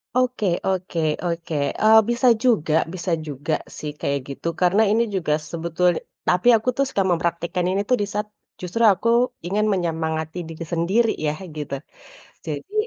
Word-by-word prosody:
Oke 255 Hz, -4 st, +1 dB, 0.2 s
oke 185 Hz, -2 st, -1 dB, 0.2 s
oke, 170 Hz, -2 st, -3 dB, 0.3 s
eee, 220 Hz, +1 st, +7 dB
bisa 240 Hz, +2 st, +2 dB, 0.2 s
juga 165 Hz, -11 st, +2 dB, 0.2 s
bisa 175 Hz, -1 st, -3 dB, 0.2 s
juga, 145 Hz, +2 st, -3 dB, 0.2 s
sih, 150 Hz, -, -4 dB
kayak 140 Hz, 0 st, 0 dB
gitu 140 Hz, +4 st, -6 dB
karena 185 Hz, +4 st, +4 dB
ini 225 Hz, +2 st, +3 dB
juga 160 Hz, -5 st, 0 dB, 0.2 s
sebetul 170 Hz, +1 st, +1 dB, 0.4 s
tapi 180 Hz, +6 st, +2 dB
aku 220 Hz, +3 st, -2 dB, 0.2 s
suka 260 Hz, -8 st, 0 dB
mempraktikan 170 Hz, +1 st, -1 dB
ini, 195 Hz, +1 st, +1 dB
tuh, 250 Hz, -, +4 dB
di -, -, +2 dB
saat 210 Hz, +1 st, -2 dB, 0.3 s
justru 185 Hz, +6 st, -2 dB
aku 230 Hz, -, -4 dB, 0.4 s
ingin 210 Hz, +3 st, +1 dB
menyemangati 160 Hz, -1 st, -2 dB
diri 165 Hz, +1 st, -7 dB
sendiri, 200 Hz, +7 st, +2 dB, 0.2 s
ya, 150 Hz, -, +1 dB, 0.2 s
gitu. 145 Hz, -2 st, -4 dB, 0.7 s
Jadi 155 Hz, -, -6 dB
175 Hz, 150 wpm, -22 LUFS, 160-210 Hz, 0.7 s, eee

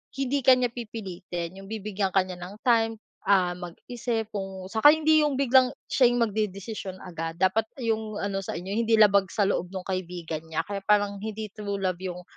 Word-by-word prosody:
hindi 275 Hz, +1 st, 0 dB
ka 260 Hz, +1 st, +8 dB
niya 250 Hz, -1 st, 0 dB
pipilitin 190 Hz, -6 st, -6 dB
yung 195 Hz, -, -11 dB
bibigyan 210 Hz, -2 st, -2 dB
ka 195 Hz, 0 st, +4 dB
niya 185 Hz, -1 st, -8 dB
ng 180 Hz, +3 st, -8 dB
time, 225 Hz, -2 st, +3 dB, 0.3 s
ah, 190 Hz, -3 st, +4 dB
mag-isip 220 Hz, +6 st, -4 dB
kung 195 Hz, -2 st, -5 dB
saka 290 Hz, +7 st, +7 dB
hindi 315 Hz, 0 st, +4 dB
yung 290 Hz, -2 st, 0 dB
biglang 260 Hz, -1 st, +4 dB, 0.2 s
siya 255 Hz, -, +5 dB
yung 240 Hz, 0 st, +2 dB
magdedesisyon 205 Hz, -2 st, -3 dB
agad. 165 Hz, -2 st, -5 dB
Dapat 190 Hz, +5 st, +2 dB, 0.2 s
yung 220 Hz, -2 st, -1 dB
ano 200 Hz, -1 st, -2 dB
sa 195 Hz, -, -5 dB
inyo 180 Hz, +3 st, -6 dB
hindi 230 Hz, -1 st, +3 dB
labag 200 Hz, -3 st, +5 dB
sa 205 Hz, -, 0 dB
loob 195 Hz, -2 st, 0 dB
nung 185 Hz, -, -4 dB
kaibigan 180 Hz, -4 st, -4 dB
niya. 160 Hz, 0 st, -1 dB
Kaya 200 Hz, +3 st, -4 dB
parang 205 Hz, -1 st, +3 dB
hindi 215 Hz, 0 st, -5 dB
true 205 Hz, -1 st, -4 dB
love 185 Hz, -2 st, 0 dB
yung 180 Hz, -1 st, -5 dB
200 Hz, 190 wpm, -26 LUFS, 185-225 Hz, 0.3 s, ka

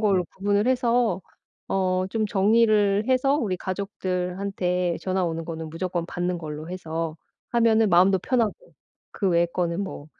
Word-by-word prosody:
걸로 195 Hz, -4 st, +2 dB
구분을 205 Hz, +3 st, +1 dB
해서 240 Hz, -5 st, +2 dB, 0.5 s
어 185 Hz, -1 st, +1 dB
좀 220 Hz, -1 st, 0 dB
정리를 210 Hz, 0 st, +3 dB
해서 260 Hz, +2 st, +3 dB
우리 205 Hz, -10 st, -1 dB
가족들한테 180 Hz, -1 st, -2 dB
전화 185 Hz, -1 st, 0 dB
오는 165 Hz, -1 st, -3 dB
거는 160 Hz, -1 st, -6 dB
무조건 175 Hz, +1 st, -3 dB
받는 175 Hz, 0 st, -2 dB
걸로 155 Hz, -1 st, -7 dB
해서 165 Hz, -3 st, -4 dB, 0.4 s
하면은 225 Hz, -2 st, +4 dB
마음도 185 Hz, +2 st, +5 dB
편하고 235 Hz, +1 st, +1 dB, 0.6 s
그 195 Hz, -, 0 dB
외에 170 Hz, 0 st, +3 dB
거는 170 Hz, +1 st, -2 dB
뭐 190 Hz, -6 st, -7 dB
185 Hz, 300 characters per minute, -25 LUFS, 175-210 Hz, 0.6 s, 마음도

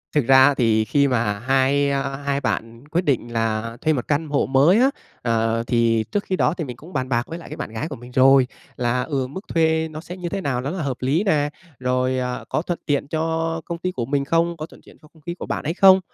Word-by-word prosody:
Thực 145 Hz, -5 st, +3 dB
ra 130 Hz, 0 st, +8 dB
á, 145 Hz, -, +4 dB
thì 110 Hz, -4 st, +2 dB
khi 140 Hz, +6 st, +2 dB
mà 115 Hz, -6 st, 0 dB
hai, 135 Hz, +3 st, +2 dB
a, 140 Hz, 0 st, 0 dB
hai 140 Hz, 0 st, -2 dB
bạn 115 Hz, -1 st, -3 dB
quyết 165 Hz, +4 st, 0 dB
định 125 Hz, -5 st, 0 dB
là 115 Hz, 0 st, -1 dB
thuê 155 Hz, -, +2 dB
một 125 Hz, -4 st, -3 dB
căn 150 Hz, +2 st, 0 dB
hộ 145 Hz, -, +1 dB
mới 140 Hz, +10 st, +4 dB
á, 260 Hz, +2 st, +5 dB, 0.3 s
ờ, 115 Hz, -1 st, +1 dB
thì 115 Hz, -2 st, +2 dB
trước 205 Hz, -1 st, 0 dB
khi 190 Hz, -, -1 dB
đó 165 Hz, -, +2 dB
thì 170 Hz, -, -2 dB
mình 125 Hz, -5 st, -7 dB
cũng 165 Hz, +8 st, -13 dB
bàn 130 Hz, -1 st, -2 dB
bạc 120 Hz, -2 st, +1 dB
với 165 Hz, -, -6 dB
lại -, -, -11 dB
cái -, -, -6 dB
bạn -, -, -5 dB
gái 115 Hz, +7 st, -4 dB
của 155 Hz, -, -6 dB
mình 120 Hz, 0 st, -12 dB
rồi. 130 Hz, 0 st, +5 dB, 0.3 s
Là, 125 Hz, +1 st, 0 dB
ừ, 135 Hz, -1 st, -2 dB
mức 140 Hz, +8 st, -7 dB
thuê 160 Hz, -1 st, +2 dB
nó 155 Hz, 0 st, -8 dB
sẽ 175 Hz, +2 st, -9 dB
như 175 Hz, -2 st, -4 dB
thế 195 Hz, -, -3 dB
nào 130 Hz, -7 st, -1 dB
nó 135 Hz, -, -3 dB
là 180 Hz, +2 st, -3 dB
hợp 135 Hz, -3 st, -2 dB
lý 140 Hz, +9 st, +1 dB
nè, 150 Hz, -8 st, +2 dB, 0.3 s
rồi, 130 Hz, 0 st, 0 dB
à, 125 Hz, 0 st, -3 dB
có -, -, 0 dB
thuận 175 Hz, 0 st, -3 dB
tiện 145 Hz, -2 st, 0 dB
cho 165 Hz, +1 st, -1 dB
công 170 Hz, -, -4 dB
ty 185 Hz, +2 st, -2 dB
của 120 Hz, -9 st, -3 dB
mình 140 Hz, +2 st, 0 dB
không, 165 Hz, +3 st, +1 dB
có 155 Hz, -, -5 dB
thuận 160 Hz, -, -17 dB
tiện -, -, -17 dB
cho 155 Hz, -, -17 dB
công 160 Hz, -, -21 dB
ty 170 Hz, -, -4 dB
của 175 Hz, -, -7 dB
bạn -, -, -3 dB
ấy 155 Hz, -, -1 dB
không. 190 Hz, 0 st, +7 dB
140 Hz, 270 wpm, -22 LUFS, 125-160 Hz, 0.3 s, ra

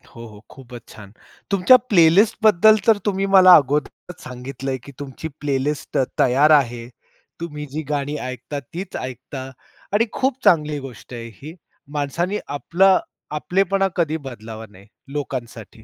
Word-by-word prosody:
हो, 115 Hz, 0 st, -9 dB
हो. 105 Hz, -2 st, -14 dB
खूपच 120 Hz, -3 st, -13 dB
छान. 100 Hz, -2 st, -13 dB, 0.4 s
तुमच्या 195 Hz, +6 st, +6 dB
प्लेलिस्टबद्दल 210 Hz, +3 st, +5 dB
तर 220 Hz, -2 st, +5 dB
तुम्ही 195 Hz, -1 st, 0 dB
मला 185 Hz, -1 st, +9 dB
अगोदरच 150 Hz, +5 st, -1 dB
सांगितलंय, 130 Hz, +1 st, -6 dB
की 140 Hz, -, -11 dB
तुमची 140 Hz, +2 st, -7 dB
प्लेलिस्ट 145 Hz, +1 st, -2 dB
त 130 Hz, -, +3 dB, 0.2 s
तयार 140 Hz, +5 st, +4 dB
आहे. 120 Hz, -5 st, +2 dB, 0.5 s
तुम्ही 150 Hz, -3 st, -6 dB
जी 155 Hz, +2 st, -3 dB
गाणी 145 Hz, 0 st, -2 dB
ऐकता, 130 Hz, +3 st, -6 dB
तीच 175 Hz, +8 st, -9 dB
ऐकता. 130 Hz, +1 st, -7 dB, 0.4 s
आणि 225 Hz, +3 st, +3 dB
खूप 265 Hz, -1 st, -1 dB
चांगली 150 Hz, -7 st, +3 dB
गोष्ट 130 Hz, -2 st, -11 dB
आहे 115 Hz, -1 st, -7 dB
ही. 155 Hz, +4 st, -9 dB, 0.4 s
माणसांनी 170 Hz, +8 st, -2 dB
आपलं 185 Hz, +6 st, +2 dB, 0.4 s
आपलेपणा 195 Hz, +4 st, +1 dB
कधी 160 Hz, -2 st, 0 dB
बदलावा 110 Hz, -2 st, -9 dB
नाही, 100 Hz, 0 st, -18 dB, 0.3 s
लोकांसाठी. 120 Hz, -6 st, -6 dB
145 Hz, 135 wpm, -21 LUFS, 130-180 Hz, 0.5 s, मला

